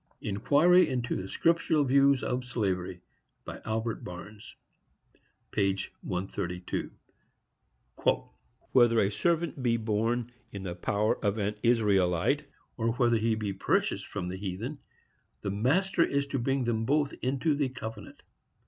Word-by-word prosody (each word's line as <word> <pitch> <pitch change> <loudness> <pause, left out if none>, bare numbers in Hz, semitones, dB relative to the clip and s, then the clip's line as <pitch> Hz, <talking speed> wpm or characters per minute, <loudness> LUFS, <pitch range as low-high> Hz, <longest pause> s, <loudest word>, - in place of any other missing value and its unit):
—Inquiry 150 - +4
into 125 -2 -1
the 95 - -4
Scriptural 165 - +2
Views 140 0 +4
of 125 0 -1
Slavery. 95 -7 -2 0.4
By - - -7
Albert 110 +1 -2
Barnes, 100 +4 -9 1.0
p. 100 -1 +1 0.2
132. 90 -1 -3 1.8
Whether 120 -3 +5
a 100 -1 +2
servant 170 - 0
be 120 -2 +2
born 115 +2 -1 0.2
in 100 -1 -6
the 90 -2 -3
power 100 +4 0
of 100 0 +1
an 105 0 0
Israelite, 100 -7 +2 0.3
or 115 0 +1
whether 120 -1 +3
he 110 0 +1
be 105 -2 -3
purchased - - 0
from 90 - -4
the 95 - -4
heathen, 100 +9 -5 0.6
the 100 - -1
master 170 - +2
is 140 -2 0
to 135 - -1
bring 135 +2 0
them 115 -2 0
both 145 +3 +1
into 135 +5 +1
the 140 -2 0
covenant. 110 -5 -8
115 Hz, 130 wpm, -29 LUFS, 100-135 Hz, 1.8 s, Whether